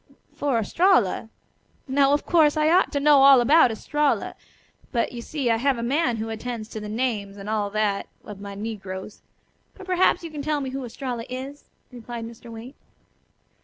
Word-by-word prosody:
"For 285 -4 0
Estralla? 230 - +2 0.6
Now, 275 +1 +3
of 290 - +1
course, 310 -3 +4
I 305 +1 +3
ought 365 +2 +3
to 285 - +1
know 285 -1 +5
all 275 -1 +8
about 280 +3 +5
Estralla. 295 +6 -1 0.6
But, 235 -3 0
you 240 -1 -7
see, 265 -1 -2
I 225 - +2
have 265 +2 +1
a 235 - -4
man 265 0 +1
who 220 +1 -4
attends 225 0 -5
to 220 - -6
the 210 0 -7
names, 215 -4 -2
and 200 0 -9
all 210 -1 -1
that, 205 -1 -1 0.2
of 205 -1 -9
my 200 -1 -7
negroes. 200 -2 -7 0.5
But 385 - -11
perhaps 370 -1 +2
you 330 - -7
can 300 -2 -5
tell 300 +1 -1
me 265 -2 -4
who 270 0 -5
Estralla 245 -1 -5
is?" 265 +3 -7 0.3
replied 240 -1 -7
Mr. 230 +1 -11
Waite. 230 +4 -10
245 Hz, 185 wpm, -24 LUFS, 220-285 Hz, 0.6 s, all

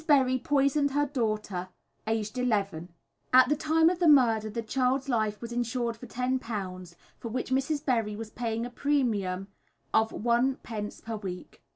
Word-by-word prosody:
Berry 260 -4 +4
poisoned 285 0 +2
her 290 +1 +2
daughter, 215 -8 -2 0.4
aged 220 +2 -1
11. 200 -8 -1 0.4
At 255 0 +7
the 300 - +3
time 315 +2 +3
of 350 0 +2
the 345 - +3
murder 230 -7 +5
the 230 +2 -4
child's 260 +3 0
life 215 -5 0
was 235 0 -7
insured 240 0 -1
for 245 +2 -11
£10, 210 -9 -3 0.2
for - - -6
which 250 +2 -3
Mrs. 285 +3 0
Berry 225 -5 +1
was 220 0 -7
paying 230 -1 -2
a 245 - -7
premium 215 -10 0 0.5
of 220 0 +4
1d. 235 -2 -1
per 225 -1 -4
week. 185 -3 -8
235 Hz, 160 wpm, -28 LUFS, 215-265 Hz, 0.5 s, At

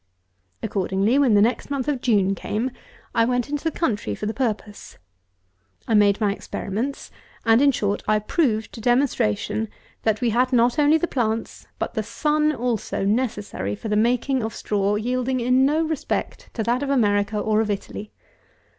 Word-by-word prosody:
Accordingly, 195 +6 +1
when 255 -7 +4
the 205 - +6
next 235 +4 0
month 275 -2 -2
of 280 -4 -1
June 200 -6 +2
came, 220 +6 -2 0.4
I 230 -1 +3
went 245 +2 0
into 295 0 -2
the 325 - +1
country 210 - -2
for - - -5
the 215 - -2
purpose. 215 -5 -4 0.9
I - - 0
made 205 -1 +4
my 205 -2 +1
experiments, 225 +7 -4 0.3
and, 225 +2 +5
in 285 0 +5
short, 205 -5 -1
I 215 - +4
proved 220 -1 0
to 225 - -8
demonstration, 230 - +1 0.3
that 220 -1 +1
we 240 -2 +1
had 250 +3 +2
not 245 +3 +3
only 295 +2 +5
the 320 - 0
plants, 225 -5 -2
but - - -3
the - - -1
sun 300 0 +1
also, 240 -7 -2
necessary 205 - -1
for 220 - -6
the 210 - +1
making 245 +4 +2
of 220 0 -4
straw, 205 0 0
yielding 250 +4 -1
in 250 +2 +3
no 310 +3 +2
respect 315 -3 -3
to 225 - -1
that 240 +4 0
of 285 - -2
America 210 -5 +2
or 215 +1 +2
of 220 - -2
Italy. 205 +1 -5
230 Hz, 175 wpm, -23 LUFS, 210-260 Hz, 0.9 s, the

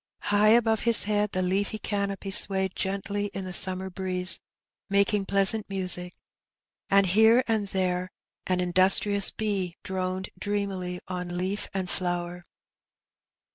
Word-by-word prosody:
High 205 +1 +4
above 225 0 +4
his 230 0 +5
head 210 0 0
the 185 - -1
leafy 200 +4 -1
canopy 200 -2 -4
swayed 190 -1 +3
gently 200 +1 -3
in 195 -1 -5
the 185 - -6
summer 185 +1 +3
breeze, 185 -1 -2 0.5
making 200 0 +1
pleasant 200 +2 +2
music, 180 -2 -1 0.7
and 200 0 +4
here 220 +6 +4
and 220 -3 -1
there 185 -1 -2 0.4
an 185 -1 0
industrious 190 +3 +3
bee 195 -5 -3
droned 185 0 -4
dreamily 195 -3 -3
on 180 -1 -5
leaf 190 +3 -3
and 190 -1 -3
flower. 175 -1 -3
190 Hz, 130 wpm, -26 LUFS, 185-205 Hz, 0.7 s, his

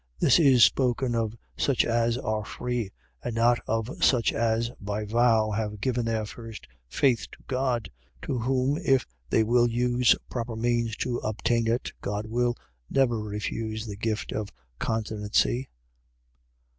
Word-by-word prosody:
.This 135 - +5
is 135 -7 +6
spoken 125 -1 +3
of 115 -1 -1 0.2
such 135 -3 +2
as 115 0 +1
are 110 -3 -2
free, 120 -2 -3 0.3
and 120 - -3
not 120 +1 +4
of 115 +2 -2
such 120 -4 +4
as, 115 +1 0
by 105 +1 -3
vow, 110 -1 +3
have 105 0 -3
given 125 0 0
their 110 -1 -1
first 115 0 -9 0.2
faith 120 - +1
to - - -15
God; 130 -3 -1 0.3
to 130 - -2
whom 130 +4 +1
if 135 -4 +3 0.2
they 110 - +3
will 120 +2 +3
use 120 +1 +3
proper 115 -2 -4
means 115 -1 0
to 120 -2 -1
obtain 115 +2 0
it, 120 +2 0
God 105 +1 -3
will 120 +2 0 0.3
never 120 -4 +2
refuse 110 +1 -4
the 105 -2 -6
gift 110 +1 -2
of 105 -2 -3 0.3
continency. 110 +3 0
115 Hz, 145 wpm, -27 LUFS, 110-125 Hz, 0.3 s, is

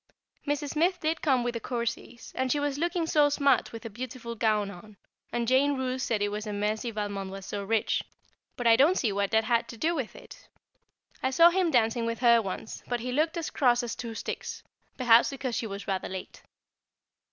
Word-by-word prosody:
Mrs. 290 0 -1
Smith 355 +4 +1
did 315 0 -1
come 265 -5 +2
with 240 0 -1
the 230 - -3
Courceys, 235 0 -4
and 260 -1 -1
she 290 - +2
was 290 -1 -1
looking 345 0 0
so 295 -2 +4
smart 280 -3 +2
with 230 0 -9
a - - -4
beautiful 240 +1 -6
gown 215 -3 +1
on, 200 +3 -13 0.3
and 235 -1 -1
Jane 275 +3 +3
Roose 260 0 -2
said 215 -3 0
it 205 - +1
was 210 +1 -4
a 210 - -3
mercy 210 +3 -1
Valmond 205 -3 -4
was 195 0 -8
so 200 0 -4
rich; 220 +2 +1 0.6
but 245 - -4
I 230 -1 +7
don't 305 +10 +4
see 225 - +1
what 200 0 0
that 220 0 +3
had 235 +1 +1
to 230 - -9
do 325 +8 +1
with 270 -9 -4
it. - - -14 0.7
I 260 - +1
saw 335 +6 +6
him 365 -1 +2
dancing 230 -3 +2
with 230 0 -2
her 235 -2 +6
once, 195 +2 -6
but 245 -1 -2
he 250 +1 -3
looked 315 +5 +1
as 330 - -3
cross 245 -2 +3
as 240 - -4
two 230 -2 -6
sticks, - - -5 0.3
perhaps 240 -2 +5
because 270 -3 -4
she 230 - -2
was 200 -1 -7
rather 190 -2 -2
late. 185 0 -7
240 Hz, 215 wpm, -28 LUFS, 220-280 Hz, 0.7 s, I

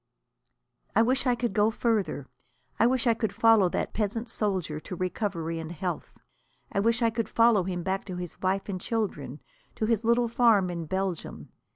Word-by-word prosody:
I 225 - +6
wish 260 +3 +1
I 245 - +3
could 240 0 -2
go 210 0 +3
further. 215 - -1 0.5
I 230 - +5
wish 255 -1 +1
I 235 - +5
could 220 -2 -2
follow 225 -4 +5
that - - -2
peasant 225 +2 -2
soldier 185 -9 -1
to 180 - -7
recovery 175 -3 -2
and 160 0 -6
health. 175 +1 -5 0.5
I - - 0
wish 230 +3 +2
I 230 - +3
could 225 0 -2
follow 230 -3 +4
him 180 -2 -3
back 190 +1 -2
to 185 -3 -6
his 180 -1 -6
wife 190 +1 0
and 185 -3 -4
children, 150 - -3 0.3
to 220 - -1
his 225 -1 +1
little 235 +1 +3
farm 225 -6 +3
in 170 -2 -5
Belgium. 190 -1 -3
205 Hz, 185 wpm, -27 LUFS, 180-230 Hz, 0.5 s, I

